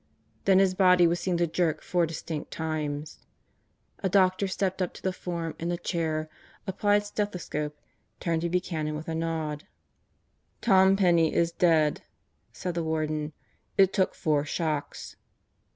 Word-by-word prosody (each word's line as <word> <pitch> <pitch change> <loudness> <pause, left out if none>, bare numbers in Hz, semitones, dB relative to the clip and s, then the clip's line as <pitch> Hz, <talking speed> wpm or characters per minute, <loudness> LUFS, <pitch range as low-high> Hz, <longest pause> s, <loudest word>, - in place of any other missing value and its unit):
Then 195 -1 +5
his 190 -1 +4
body 180 -2 +5
was 170 +1 +2
seen 180 -2 0
to 170 - +2
jerk 170 -1 0
four 175 -2 +1
distinct 160 -1 -5
times. 155 -2 -4 0.8
A 190 - -1
doctor 185 +1 +3
stepped 190 0 -1
up 180 - -1
to - - -11
the 190 - 0
form 170 -3 -4
in 170 - -2
the 175 - -1
chair, 160 -3 -2 0.4
applied 205 +1 +1
stethoscope, 180 -8 -3 0.4
turned 165 -2 0
to 170 - -1
Buchanan 165 -4 -1
with 155 +1 -6
a 165 - -2
nod. 160 -2 -3 0.9
"Tom 190 -2 +5
Penney 170 -5 +3
is 170 0 +2
dead," 160 -4 +3 0.5
said 180 - -4
the 170 -1 -2
Warden. 155 -1 -2 0.4
"It 195 -1 +5
took 190 -2 +1
four 150 -2 +1
shocks." 155 -1 -3
170 Hz, 150 wpm, -27 LUFS, 155-185 Hz, 0.9 s, Then